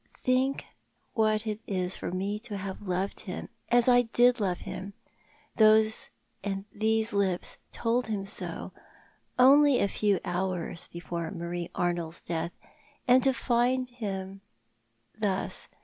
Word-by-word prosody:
" - - -35
Think 260 +2 +1 0.5
what 215 -1 +2
it 215 -1 -2
is 185 -1 -1
for - - -4
me 195 +4 -2
to 215 -2 -5
have 190 0 -6
loved 190 0 -2
him— 180 - -6 0.2
as 240 0 +4
I 245 -1 +7
did 245 +1 +3
love 185 -4 -1
him— 190 +2 -6 0.6
these 215 0 +1
lips 190 -3 0
told 240 +1 0
him 205 -3 -2
so— 195 - -5 0.7
only 275 +2 +7
a - - +3
few 200 -1 +1
hours 180 -1 -2
before 170 -1 -5
Marie 170 +1 -4
Arnold's 175 -2 -1
death— 170 0 -3 0.5
and 255 +1 +6
to 270 - +4
find 250 0 +1
him— 195 -5 -5 0.8
thus. 195 -3 -1
205 Hz, 130 wpm, -29 LUFS, 185-235 Hz, 0.8 s, I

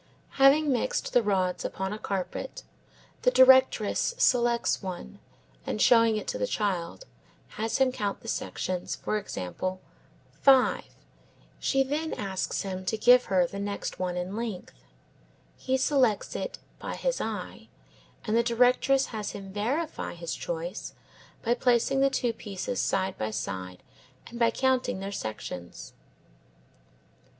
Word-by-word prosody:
Having 280 +2 +6
mixed 255 0 -1
the 245 - +5
rods 185 -4 0
upon 190 +1 -3
a 215 - -6
carpet, 195 - -4 0.6
the - - +4
directress 260 - +5
selects 240 - +2
one, 180 - -7 0.4
and - - -3
showing 230 -1 +5
it 210 - -5
to - - -3
the 100 - 0
child, 195 - -2 0.4
has 225 +1 -2
him 265 -1 +3
count 205 -5 -3
the - - -12
sections; 185 -4 -3
for 215 - -2
example, 185 - -4 0.6
5. 265 -2 +5 0.7
She 270 -1 +2
then 300 +4 -2
asks 190 -2 -2
him 190 -1 -5
to 220 - -1
give 245 +3 +6
her 185 -2 +3
the 200 - -7
one 200 - -3
next 200 0 -4
in 180 +1 -3
length. 220 -5 -5 0.8
He 260 0 -1
selects 260 -5 +1
it - - -4 0.2
by - - -5
his - - -1
eye, - - -5 0.6
and 215 -1 0
the 235 - +5
directress 250 +3 +3
has 215 -2 -4
him 195 -1 -8
verify 265 - -2
his 170 -1 -5
choice 170 +3 -5 0.5
by 235 - +2
placing 245 +2 +2
the 275 0 +4
two 245 -3 0
pieces 210 +3 -5
side 190 0 0
by 110 - -1
side 95 -4 -5 0.4
and 235 - -9
by 230 -1 +5
counting 260 -6 0
their 195 +1 -5
sections. 105 - -6
215 Hz, 140 wpm, -28 LUFS, 185-255 Hz, 0.8 s, Having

